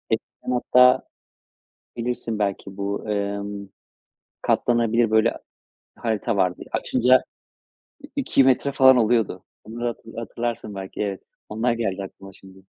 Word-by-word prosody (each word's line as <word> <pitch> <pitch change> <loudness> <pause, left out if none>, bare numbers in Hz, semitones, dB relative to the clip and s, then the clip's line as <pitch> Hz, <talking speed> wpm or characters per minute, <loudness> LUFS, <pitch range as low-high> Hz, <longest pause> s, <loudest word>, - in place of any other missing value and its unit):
Eskiden - - -9
hatta, 125 0 +5 1.0
bilirsin 120 -2 -3
belki, 100 -1 -3
bu, 100 0 -3
ımm, 100 -1 -3 0.7
katlanabilir, 115 -1 +2
böyle, 110 +1 +4
a - - -11 0.6
harita 115 0 -1
vardı 90 -2 0
açınca 125 +2 +3 0.8
i - - -6
iki 260 - +3
metre 135 +2 +2
falan 130 -1 +6
oluyordu. 110 -5 +1 0.2
Onları 120 +2 -5
hatı 120 - -4 0.2
hatırlarsın 115 -1 -4
belki, 95 +1 -5
evet. 100 -2 -3 0.3
Onlar 115 +3 0
geldi 110 -5 -2
aklıma 95 0 -10
şimdi. 95 0 -16
110 Hz, 125 wpm, -23 LUFS, 100-120 Hz, 1.0 s, falan